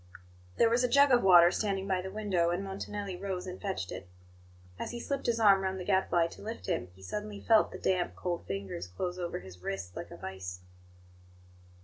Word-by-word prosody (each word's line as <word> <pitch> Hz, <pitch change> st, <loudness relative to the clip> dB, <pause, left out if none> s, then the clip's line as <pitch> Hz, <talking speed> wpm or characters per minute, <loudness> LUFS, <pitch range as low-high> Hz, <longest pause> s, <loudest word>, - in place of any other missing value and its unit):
There 230 Hz, -, +5 dB
was 240 Hz, +2 st, +3 dB
a -, -, +4 dB
jug 280 Hz, +2 st, +5 dB
of 245 Hz, -1 st, +6 dB
water 175 Hz, -2 st, +8 dB
standing 195 Hz, -2 st, -1 dB
by 190 Hz, -2 st, +1 dB
the 190 Hz, -, -6 dB
window, 190 Hz, -4 st, 0 dB
and 175 Hz, +3 st, -1 dB
Montanelli 195 Hz, 0 st, -5 dB
rose 190 Hz, -1 st, -4 dB
and 185 Hz, 0 st, -7 dB
fetched 190 Hz, -, -3 dB
it. 90 Hz, 0 st, -7 dB, 0.7 s
As -, -, -3 dB
he 240 Hz, -, -5 dB
slipped 275 Hz, +3 st, -3 dB
his 230 Hz, -1 st, +1 dB
arm 200 Hz, -3 st, +6 dB
round 190 Hz, 0 st, -2 dB
the 180 Hz, -, -5 dB
Gadfly 190 Hz, -3 st, +3 dB
to -, -, -12 dB
lift 225 Hz, +3 st, -6 dB
him, 170 Hz, -, -1 dB
he 95 Hz, -, -16 dB
suddenly 210 Hz, -, -5 dB
felt 220 Hz, 0 st, +4 dB
the -, -, -7 dB
damp, 185 Hz, -2 st, 0 dB
cold 175 Hz, -2 st, -3 dB
fingers 95 Hz, -3 st, -4 dB
close 180 Hz, -, -4 dB
over 175 Hz, -, -3 dB
his 90 Hz, -1 st, -12 dB
wrist 95 Hz, -1 st, -5 dB
like -, -, -6 dB
a -, -, -10 dB
vice. 90 Hz, -1 st, -7 dB
190 Hz, 210 wpm, -31 LUFS, 165-205 Hz, 0.7 s, water